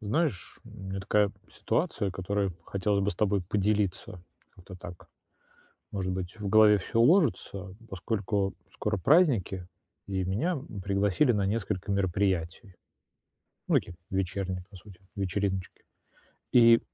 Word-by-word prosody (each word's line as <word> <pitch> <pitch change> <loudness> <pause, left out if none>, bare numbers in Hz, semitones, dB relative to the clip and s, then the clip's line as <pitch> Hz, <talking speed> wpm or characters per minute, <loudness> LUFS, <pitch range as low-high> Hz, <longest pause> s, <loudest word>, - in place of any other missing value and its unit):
Знаешь, 120 - -1
у - - -13
меня 95 0 -4
такая 100 +1 +2 0.2
ситуация, 100 - -1
которой 95 +1 -1
хотелось 100 +1 0
бы 100 - +1
с 85 - -8
тобой 100 -1 +1
поделиться. 100 0 -1 0.3
Как-то 95 +1 -12
так. 90 -1 -11 0.8
Может 95 -2 -2
быть, 95 +3 -5
в 105 - -3
голове 110 0 +7
всё 105 +4 -2
уложится, 115 - +2
поскольку 100 +1 -1 0.2
скоро 105 -1 -2
праздники, 105 - +3 0.4
и 95 -1 -1
меня 115 - 0 0.3
пригласили 100 +7 +2
на 100 -2 +1
несколько 100 -1 -2
мероприятий. 95 -1 -1 0.9
Ну, - - +4
таких: 90 - -1 0.2
вечерние, 95 -1 -2
по 100 - -13
сути, 95 0 -14 0.2
вечериночки. 95 -1 -2 0.7
И, 115 -1 +7
100 Hz, 125 wpm, -29 LUFS, 95-105 Hz, 0.9 s, голове